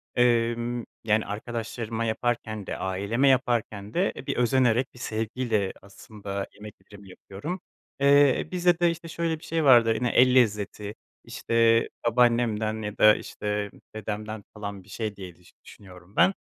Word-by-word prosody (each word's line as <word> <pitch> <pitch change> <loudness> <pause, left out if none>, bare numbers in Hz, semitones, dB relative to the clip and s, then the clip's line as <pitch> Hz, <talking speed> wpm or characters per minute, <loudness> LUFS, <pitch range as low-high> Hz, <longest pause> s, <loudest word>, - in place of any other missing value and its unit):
emm, 120 0 +1 0.2
yani, 110 0 +2
arkadaşlarıma 115 +1 -4
yaparken 110 -2 -2
de - - -4
aileme 100 +8 0
yaparken 120 -6 0
de, 185 +3 +1
e, - - -9
bir - - -2
özenerek, 125 0 +2
bir 125 - -15
sevgiyle 110 -3 -2
aslında 100 0 -7
yemeklerimi 100 -1 -13
yapıyorum. 130 - -7 0.4
Eee, 140 -1 +4
bizde 175 -1 +2
de, 175 -1 +4
işte, 165 0 -8
şöyle 165 -1 -2
bir - - -18
şey 165 -1 -1
vardır 120 -5 +6
yine, 120 +2 0
el 125 +2 +4
lezzeti, 105 -3 +1 0.3
işte, 115 0 +2 0.2
babaannemden 115 -2 +2
ya 105 -1 -5
da, 105 0 +7
işte, 105 -1 -4 0.2
dedemden, 110 0 -5
falan, 100 -2 -7
bir 95 - -21
şey 105 +1 -4
diye 95 -3 -9
düş 90 +1 -22
düşünüyorum 90 0 -15
ben. 185 +3 +5
115 Hz, 145 wpm, -26 LUFS, 105-125 Hz, 0.4 s, da